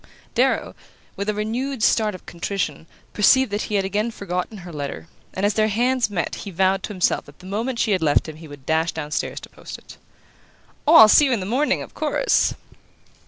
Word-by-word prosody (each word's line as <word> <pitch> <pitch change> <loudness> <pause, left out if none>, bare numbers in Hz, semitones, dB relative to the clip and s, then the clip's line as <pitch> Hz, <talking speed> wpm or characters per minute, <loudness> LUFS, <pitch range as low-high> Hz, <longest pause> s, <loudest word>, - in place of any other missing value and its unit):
Darrow, - - +1 0.4
with 200 +1 -3
a - - +1
renewed 230 +4 -2
start 215 -4 +2
of - - -13
contrition, 170 -3 -4 0.3
perceived 260 +3 +4
that 205 +1 -1
he 210 - -1
had 195 -1 +1
again 210 +4 -1
forgotten 200 -1 -4
her 175 - -9
letter; 145 +2 -5 0.2
and 190 - -2
as 205 - +2
their 215 +1 +2
hands 240 +3 +1
met 185 -4 -2
he - - -7
vowed 190 +1 +1
to - - -6
himself 185 -3 0
that 145 - -16
the 180 - -15
moment 225 +6 -3
she 220 - +1
had 185 -3 +1
left 150 -1 +2
him 155 -1 -8
he 160 0 -11
would 145 -3 -13
dash 160 +2 +1
down 150 - -6
stairs - - -2
to - - -11
post - - -10
it. - - -15 0.9
"Oh, 320 - +6
I'll 220 - +11
see 290 +7 +6
you 270 - +1
in 230 - 0
the 185 - -4
morning, 260 +9 0
of - - -13
course!" - - +1
205 Hz, 215 wpm, -22 LUFS, 175-225 Hz, 0.9 s, I'll